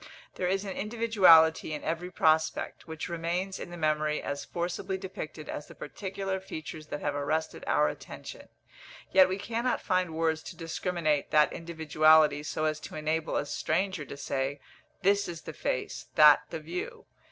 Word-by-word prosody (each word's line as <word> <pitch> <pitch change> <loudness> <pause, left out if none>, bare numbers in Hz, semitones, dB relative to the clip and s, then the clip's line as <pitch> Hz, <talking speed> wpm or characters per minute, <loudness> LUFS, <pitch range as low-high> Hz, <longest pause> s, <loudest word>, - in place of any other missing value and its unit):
There 180 - -2
is 195 +2 0
an 195 - -5
individuality 195 -9 +5
in 150 - -7
every 170 +3 -2
prospect, 160 -2 +1
which 160 -1 -5
remains 175 +3 -2
in - - -7
the 175 - -8
memory 155 -1 +1
as 140 0 -4
forcibly 180 +2 -3
depicted 160 -5 -7
as 145 - -6
the - - -13
particular 195 +3 -4
features 155 -4 -8
that 150 - -5
have 145 - -1
arrested 145 +3 -2
our - - +3
attention; - - -8 0.6
yet 190 -1 +6
we 190 - -1
cannot 235 +4 -1
find 185 -4 0
words 160 -1 +1
to - - -9
discriminate 165 -2 -1
that 150 -1 +4
individuality 155 -2 +3
so 155 +1 -2
as 155 0 0
to - - -9
enable 155 +1 -1
a - - -1
stranger 175 +3 -1
to 140 +1 -9
say, 140 0 -2 0.4
this 200 +1 +3
is 170 -2 -7
the - - -7
face, - - -3
that 150 -1 +7
the 165 - -5
view. 165 +3 -6
160 Hz, 165 wpm, -29 LUFS, 155-185 Hz, 0.6 s, that